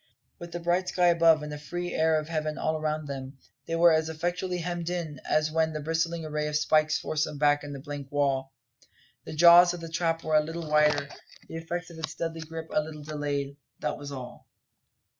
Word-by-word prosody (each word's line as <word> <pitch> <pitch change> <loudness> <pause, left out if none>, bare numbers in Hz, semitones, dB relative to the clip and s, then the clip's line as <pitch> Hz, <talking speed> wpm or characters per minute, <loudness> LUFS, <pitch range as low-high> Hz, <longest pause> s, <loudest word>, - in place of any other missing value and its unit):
With 170 -1 -8
the 175 - -4
bright 175 +2 0
sky 180 -1 +3
above, 165 -2 +5
and 150 - -6
the 150 - -6
free 175 +4 -5
air 160 0 +3
of 155 - -6
heaven 155 -1 -2
all 155 - 0
around 155 0 -2
them, 135 -1 -6 0.3
they 165 - -1
were 170 0 +6
as 160 0 +1
effectually 175 +3 -2
hemmed 175 -1 -3
in 165 -6 -4
as 155 0 +2
when 160 0 +1
that 155 -1 -4
bristling 165 +1 -1
array 150 0 -2
of 150 0 0
pikes 155 0 +3
forced 155 0 -1
them 150 - -7
back 145 0 +3
to 145 - -8
the 140 - -6
blank 145 -1 -7
wall. 135 -2 0 0.7
The - - -7
jaws 175 +2 +7
of - - -8
the 165 0 -7
trap 165 0 -1
were 155 - -2
a 155 - +5
little 165 +1 -5
wider; 150 -2 +3 0.4
the 165 - -6
effects 175 +2 -5
of 165 - -11
its 155 0 -5
deadly 165 -1 -4
grip 160 0 -7
a 155 - +3
little 150 -1 -8
delayed 145 -2 -3 0.2
that 150 -1 -3
was 145 0 -7
all. 125 -3 -9
155 Hz, 215 wpm, -28 LUFS, 150-165 Hz, 0.7 s, jaws